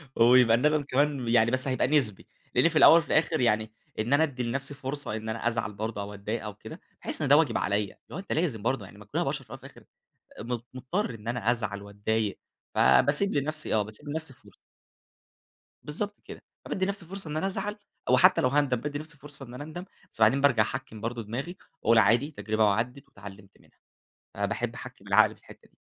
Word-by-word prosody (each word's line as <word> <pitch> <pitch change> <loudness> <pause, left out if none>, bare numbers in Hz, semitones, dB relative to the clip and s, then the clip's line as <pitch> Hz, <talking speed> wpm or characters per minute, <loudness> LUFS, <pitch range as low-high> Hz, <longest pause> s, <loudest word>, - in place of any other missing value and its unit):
ويبقى 120 0 +6
الندم 150 +4 +2
كمان 140 -1 0
يعني 115 0 +4
بس 130 +2 +3
هيبقى 130 -1 +1
نسبي، 130 -9 +1 0.3
لأني 165 - +5
في 165 - -8
الأوّل 160 - +9
وفي 165 - 0
الآخر 155 +1 +2
يعني 110 -2 +1 0.3
إن 115 +5 0
أنا 145 +3 +5
أدّي 130 -5 -2
لنفسي 135 +4 -3
فرصة 140 -3 -4
إن 110 0 -5
أنا 115 +1 -2
أزعل 115 -3 -1
برضو 105 0 -4
أو 100 +1 -6
أتضايق 105 +3 -4
أو 105 -1 -6
كده 105 - -11 0.2
بأحس - - -3
إن 145 - +1
ده 145 +2 +7
واجب 150 -8 +2
عليَّ، 100 0 -1
لو - - -7
أنت 195 - -9
لازم 155 -10 -1
برضو 120 -1 -1
ما - - -14
كلنا - - -1
بشر - - -3
في - - -25
الأوّل - - -7
والآخر - - -13 0.6
م 120 +2 -3 0.2
مضطر 130 - -2
إن 110 0 -9
أنا 120 -1 0
أزعل 100 -4 -2
وأتضايق، 100 +1 -2 0.4
فبأسيب 150 +8 +4
لنفسي 150 0 -1
آه، 110 - +3
بأسيب 110 +8 -8
لنفسي 160 -1 -4
فرصة. 125 - -20 1.3
بالضبط 205 +8 -4
كده، - - -10 0.2
فبأدي 190 - -1
لنفسي 200 -1 -3
فرصة 195 -2 -7
إن 150 - -4
أنا 160 - 0
أزعل 200 +2 -3 0.3
أو - - +5
حتّى 185 +1 +5
لو 130 - +3
هأندم 140 -1 +2
بأدي 145 +2 -4
لنفسي 155 +1 -9
فرصة 145 -1 -10
إن 120 - -11
أنا 145 - -7
أندم، 160 +4 -7 0.3
بس - - -11
بعدين 110 +5 +5
بأرجع 135 -6 +4
أحكّم 110 -1 -5
برضو 115 +1 -4
دماغي 130 - -5 0.3
وأقول 115 0 +5
عادي 115 +8 +4
تجربة 110 -6 0
وعدت 115 +6 -1
واتعلمت 100 0 -12
منها، - - -26 0.6
فباحب - - -2
أحكم - - -11
العقل - - +4
في - - -27
الحتّة - - -16
دي. - - -36
125 Hz, 205 wpm, -27 LUFS, 110-150 Hz, 1.3 s, الأوّل